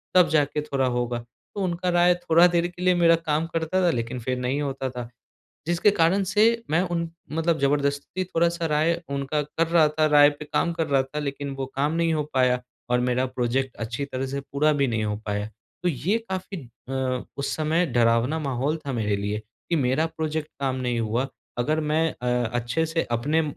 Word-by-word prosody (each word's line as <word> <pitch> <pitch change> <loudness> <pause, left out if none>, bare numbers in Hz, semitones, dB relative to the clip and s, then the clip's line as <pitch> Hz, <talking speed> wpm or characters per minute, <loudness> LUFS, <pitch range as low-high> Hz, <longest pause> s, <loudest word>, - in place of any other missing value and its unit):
तब 180 -2 +7
जाके 150 -1 +1
थोड़ा 135 -3 -1
होगा। 120 -1 -1
तो 120 - -10
उनका 180 0 -1
राय 175 0 +5
थोड़ा 175 0 +5
देर 175 0 +1
के 175 0 -11
लिए 180 0 +4
मेरा 170 -1 +5
काम 155 +2 +1
करता 165 +3 -1
था 180 - +4
लेकिन 120 0 -3
फिर 125 +2 -2
नहीं 130 +4 -1
होता 135 -2 -2
था, 125 -2 -6 0.6
जिसके 175 +4 +3
कारण 190 0 +3
से 210 +3 +3 0.3
मैं 160 +3 +3
उन 170 -2 -2 0.2
मतलब 165 +1 +1
ज़बरदस्ती 140 +5 0
थोड़ा-सा 170 -1 0
राय 155 +2 +2 0.2
उनका 140 +2 -1
कर 160 +3 -1
रहा 165 -2 +5
था 155 +1 +1
राय 145 -1 +7
पे 145 +1 -9
काम 165 +3 0
कर 165 -2 -1
रहा 140 -2 +3
था 135 +3 -6
लेकिन 140 -1 -3
वो 135 -1 -3
काम 145 +3 +1
नहीं 165 0 +1
हो 150 - 0
पाया 125 -1 +3 0.3
और 125 0 +3
मेरा 125 +1 +1
प्रोज़ेक्ट 130 +1 -1
अच्छी 115 +5 -3
तरह 135 -1 -4
से 140 +1 -3
पूरा 140 +2 +1
भी 140 -2 +2
नहीं 110 -2 -1
हो 105 0 -1
पाया। 105 0 -1 0.4
तो 180 - +2
ये 175 - 0
काफ़ी 185 +1 -4 0.3
अ, 130 -1 -1
उस 140 - -2
समय 160 +3 +1
डरावना 120 +5 +2
माहौल 140 +1 -1
था 135 - -2
मेरे 105 -4 0
लिए 100 +1 -2 0.3
कि 170 - +1
मेरा 135 +3 +2
प्रोज़ेक्ट 160 -1 -3
काम 130 -1 0
नहीं 120 -1 0
हुआ, 115 +4 -1 0.3
अगर 155 +6 +1
मैं 155 +1 +1
अ, 125 0 -1
अच्छे 120 +7 0
से 165 +1 -1
अपने 145 +8 +1
145 Hz, 200 wpm, -25 LUFS, 125-165 Hz, 0.6 s, तब